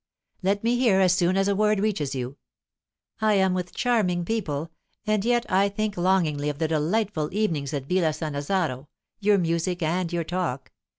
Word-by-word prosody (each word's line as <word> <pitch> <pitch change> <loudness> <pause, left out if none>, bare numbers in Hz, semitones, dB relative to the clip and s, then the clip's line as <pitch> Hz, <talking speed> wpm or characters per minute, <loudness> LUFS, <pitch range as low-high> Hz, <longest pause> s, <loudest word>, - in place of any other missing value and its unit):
"Let 200 +2 0
me 235 +1 +2
hear 220 -7 +4
as 185 -2 +4
soon 185 0 +2
as 195 0 +2
a 200 - +2
word 210 0 +2
reaches 190 -10 -1
you. 130 +2 -5 0.8
I 215 -1 +3
am 190 -1 +3
with 180 -1 -4
charming 185 -8 +1
people, 165 -7 -2 0.3
and 215 -2 +1
yet 240 +1 +2
I 195 +1 +3
think 210 0 -2
longingly 170 -5 +1
of 145 - -4
the 160 +1 0
delightful 160 +1 0
evenings 170 -9 -1
at 140 -3 -3
Villa 180 +1 +2
Sannazaro, 150 -2 -2 0.3
your 205 -1 +3
music 170 0 -1
and 170 +2 0
your 170 -1 -1
talk. 165 -6 -3
180 Hz, 175 wpm, -25 LUFS, 155-200 Hz, 0.8 s, hear